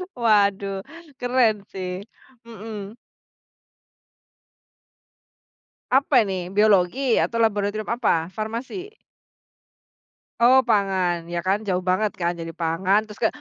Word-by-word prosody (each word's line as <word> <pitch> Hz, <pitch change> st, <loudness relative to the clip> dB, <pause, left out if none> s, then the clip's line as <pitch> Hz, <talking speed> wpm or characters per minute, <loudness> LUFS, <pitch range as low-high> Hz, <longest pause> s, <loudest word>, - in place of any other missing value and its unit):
Waduh, 200 Hz, -4 st, +2 dB, 0.4 s
keren, 245 Hz, -5 st, +2 dB
sih. 185 Hz, 0 st, -5 dB, 0.4 s
Mhm. 220 Hz, -2 st, -8 dB, 3.0 s
Apa 265 Hz, -2 st, +4 dB
ini 185 Hz, -3 st, -4 dB
Biologi? 215 Hz, +5 st, +3 dB
Atau 230 Hz, -, -1 dB
laboratorium 210 Hz, 0 st, -1 dB
apa? 185 Hz, -8 st, 0 dB
Farmasi? 230 Hz, -, -5 dB, 1.5 s
Oh, 245 Hz, +2 st, +6 dB
pangan. 185 Hz, -5 st, +1 dB
Ya, 170 Hz, -, -1 dB
kan 195 Hz, +2 st, +3 dB
jauh 185 Hz, -1 st, 0 dB
banget, 205 Hz, +3 st, +1 dB
kan. 170 Hz, 0 st, +1 dB
Dari 165 Hz, 0 st, -6 dB
pangan 180 Hz, +5 st, +1 dB
terus 210 Hz, -1 st, -13 dB
ke -, -, +6 dB
205 Hz, 100 wpm, -23 LUFS, 185-225 Hz, 3.0 s, Oh